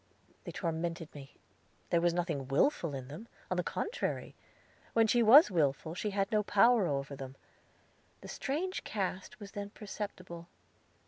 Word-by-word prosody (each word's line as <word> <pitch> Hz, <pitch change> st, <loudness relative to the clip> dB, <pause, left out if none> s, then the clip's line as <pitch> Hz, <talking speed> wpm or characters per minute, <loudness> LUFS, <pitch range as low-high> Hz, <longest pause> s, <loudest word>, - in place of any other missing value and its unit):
They -, -, -5 dB
tormented 165 Hz, -2 st, -3 dB
me. 140 Hz, -2 st, -11 dB, 0.6 s
There 170 Hz, -, +4 dB
was 175 Hz, 0 st, +3 dB
nothing 165 Hz, -6 st, -2 dB
willful 150 Hz, -, +2 dB
in 130 Hz, -2 st, -6 dB
them; 160 Hz, -, -9 dB, 0.2 s
on 185 Hz, -, +1 dB
the 180 Hz, -, +1 dB
contrary, 440 Hz, -, -3 dB, 0.6 s
when 225 Hz, -1 st, +5 dB
she 240 Hz, +2 st, +3 dB
was 235 Hz, +5 st, +8 dB
willful, 160 Hz, -1 st, +1 dB
she 210 Hz, +4 st, -2 dB
had 195 Hz, 0 st, -1 dB
no 215 Hz, -1 st, +3 dB
power 210 Hz, 0 st, +4 dB
over 140 Hz, -1 st, -2 dB
them; 135 Hz, 0 st, -8 dB, 0.9 s
the -, -, -9 dB
strange 345 Hz, +8 st, -3 dB
cast 195 Hz, +3 st, -3 dB
was 200 Hz, -2 st, -9 dB
then 205 Hz, 0 st, -5 dB
perceptible. 190 Hz, -5 st, -7 dB
185 Hz, 150 wpm, -32 LUFS, 160-215 Hz, 0.9 s, was